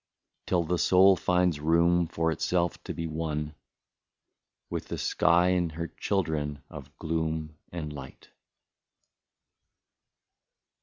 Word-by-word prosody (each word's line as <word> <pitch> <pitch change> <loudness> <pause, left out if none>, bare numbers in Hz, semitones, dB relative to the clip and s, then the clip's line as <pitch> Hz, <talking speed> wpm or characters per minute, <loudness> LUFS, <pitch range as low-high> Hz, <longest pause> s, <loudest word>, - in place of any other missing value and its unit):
Till 90 -2 +2
the 85 +1 -1
soul 95 +1 +6
finds 90 -3 +1
room 85 +2 +3
for 80 0 0
itself 85 +1 -1
to - - -4
be 85 - -3
one 75 -2 -3 1.1
With - - -5
the - - -4
sky 85 +2 +3
and 90 -2 +1
its 85 -1 -5
children 75 -7 -1
of - - -11
gloom 80 -1 -2 0.2
and 75 -4 -5
light." 65 -2 -11
80 Hz, 110 wpm, -28 LUFS, 80-90 Hz, 1.1 s, soul